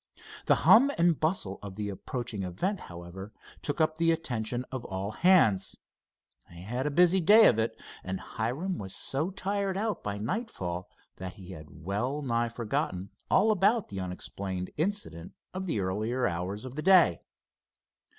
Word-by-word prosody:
The - - +6
hum 250 +6 +8
and 170 -2 +3
bustle 155 - -1
of 100 -2 -8
the 105 0 -3
approaching 115 +1 -5
event, 135 - -2
however, 85 +4 -9 0.3
took 145 +2 -3
up 155 0 +2
the 165 0 +3
attention 125 -6 -2
of 130 -2 -4
all 95 +2 -4
hands. 135 - +3 0.7
They 85 0 -12
had 120 +8 -3
a - - +2
busy 175 +5 +5
day 215 +6 +8
of 115 - +5
it, 110 - -1 0.2
and 95 0 -4
Hiram 140 +12 -3
was 95 -1 -4
so 145 +6 -1
tired 195 0 -2
out 215 +1 -1
by 100 0 -3
nightfall 100 - -4 0.3
that 90 0 -6
he 95 -1 -11
had 80 -4 -9 0.2
well 125 +10 -1
nigh 120 -2 0
forgotten 115 - -3 0.2
all 215 +3 +4
about 210 +2 +2
the 95 - -5
unexplained 95 0 -4
incident 160 - -2 0.2
of 190 0 -4
the 160 - 0
earlier 110 +7 -1
hours 90 +5 -3
of 130 - -7
the 155 - -4
day. 180 - +5
120 Hz, 160 wpm, -29 LUFS, -, 0.7 s, hum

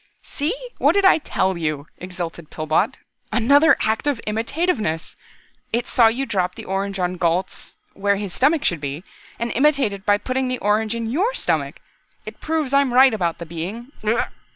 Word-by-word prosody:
"See, 300 +9 -2 0.2
what - - +4
did 400 -1 +3
I 375 - +6
tell 190 -10 -1
you," 155 -4 -3
exulted 175 -3 -6
Pillbot. 155 0 0 0.3
"Another 285 +7 +5
act 220 +6 0
of 285 -5 +1
imitativeness. 225 - -1 0.6
It 235 +2 0
saw 235 -2 +4
you 245 +5 0
drop 185 -6 -1
the - - -9
orange 195 +1 -2
on 180 0 -1
Gault's 175 +2 -2 0.2
where 200 0 +1
his 200 -2 -5
stomach 290 +3 +2
should 170 -4 +1
be, 145 +3 -5 0.3
and 235 0 -2
imitated 265 -8 +2
by 205 0 +3
putting 255 +4 -2
the 255 0 -1
orange 215 +1 0
in 230 -1 -3
your 405 - 0
stomach. - - -1 0.5
It - - -10
proves 310 -4 -1
I'm 280 -2 +3
right 260 -1 +7
about 175 -6 -1
the 170 - -7
Being 185 - -6
glug!" 220 +2 +1
220 Hz, 175 wpm, -21 LUFS, 180-270 Hz, 0.6 s, right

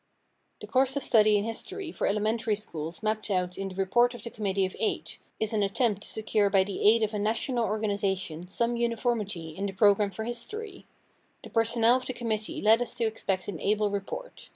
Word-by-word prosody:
The - - -6
course 265 +1 +2
of 280 - -2
study 215 -3 +5
in 200 - 0
history 340 - -4
for - - -1
elementary 215 +2 +1
schools 165 -3 -6
mapped 215 0 -1
out 180 -2 0
in 195 0 -4
the 185 - -10
"Report 240 +6 +2
of - - -10
the 235 - -6
Committee 195 -3 0
of 185 - -6
Eight" 220 - -2 0.2
is 220 0 -1
an 215 - +1
attempt 205 +1 +1
to - - -6
secure 215 -2 +1
by 195 -1 +4
the 195 0 -5
aid 225 +1 +4
of 215 0 -1
a 210 - -1
national 230 +3 0
organization 200 -6 -1
some 235 +5 0
uniformity 225 -7 -1
in 200 +3 -2
the 195 - -5
program 205 +1 +4
for 200 +3 -6
history. 375 - -5 0.6
The - - -11
personnel 230 +1 +4
of 255 - -7
the 255 - -2
committee 220 -3 -3
led 220 +2 +5
us 245 0 -3
to 235 - +1
expect 195 -4 -2
an 190 -6 -5
able 210 +2 +1
report. 200 - -6
215 Hz, 205 wpm, -28 LUFS, 200-235 Hz, 0.6 s, study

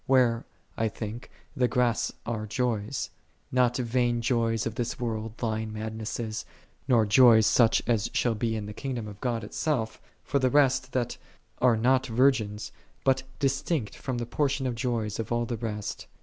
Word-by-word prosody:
Where, 125 -3 +3 0.3
I 110 - +1
think, 110 +2 -6 0.3
the 125 -3 +3
grass 120 -2 +1
are 110 -2 -3
joys; 120 0 -1 0.4
not 125 -1 +3
vain 120 -1 +1
joys 115 -2 +1
of 115 - -2
this 120 +3 -3
world, 115 -1 -3
lying 110 -1 -1
madnesses; 110 0 -4 0.4
nor 120 -5 +4
joys 110 0 +7
such 115 +1 +4
as 115 -2 +1
shall 120 - +1
be 110 +1 -1
in 105 -2 -3
the 105 - -7
kingdom 120 -3 -4
of 105 -1 -10
God 120 -3 -1
itself, 110 0 -2 0.2
for 140 - 0
the 130 -1 +3
rest 130 -2 +3
that 125 -2 -1 0.4
are 125 -3 +4
not 130 +3 +3
virgins; 115 -4 +1 0.3
but 135 -1 +3 0.2
distinct 135 -2 -1
from 130 -2 -4
the 120 - -2
portion 140 +2 0
of 125 - 0
joys 115 -3 -2
of 115 - -4
all 120 0 +1
the 120 - -3
rest. 105 -2 -4
120 Hz, 165 wpm, -28 LUFS, 110-130 Hz, 0.4 s, joys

